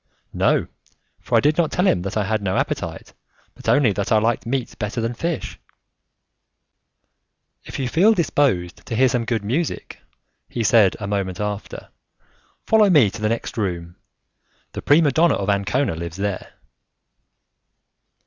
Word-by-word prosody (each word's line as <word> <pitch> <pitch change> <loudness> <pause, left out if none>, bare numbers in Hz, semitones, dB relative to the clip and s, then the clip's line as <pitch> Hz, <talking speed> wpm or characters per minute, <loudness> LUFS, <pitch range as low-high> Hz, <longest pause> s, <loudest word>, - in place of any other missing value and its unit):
"No, - - +2 0.5
for - - 0
I - - +4
did 150 +3 +2
not 165 -3 +2
tell 180 - +1
him 90 - +2
that 100 +3 -4
I 105 - +1
had 110 +2 -1
no 95 -2 -1
appetite, - - -3 0.4
but - - -5
only 145 -7 +4
that 100 0 -3
I 110 - +5
liked 115 +1 0
meat 125 -1 -2
better 105 +2 -3
than 115 +1 -1
fish." 165 +6 -4 2.1
"If - - -7
you 130 - -2
feel 195 - +4
disposed 135 - 0
to 115 - -3
hear 130 +3 +4
some 120 -2 -1
good 115 -2 -1
music," 145 +9 -3 0.5
he 120 - -3
said 110 -4 +4
a 100 - -5
moment 100 -3 -2
after, 105 0 -5 0.8
"follow 215 -2 +4
me 140 - +5
to 110 - -9
the 105 - +1
next 115 0 -3
room; 85 -4 -3 0.8
the - - -5
prima 145 +1 +4
donna 165 +5 +3
of 100 0 0
Ancona 100 +5 0
lives 85 +1 -6
there." 100 -1 -4
115 Hz, 160 wpm, -21 LUFS, 100-145 Hz, 2.1 s, I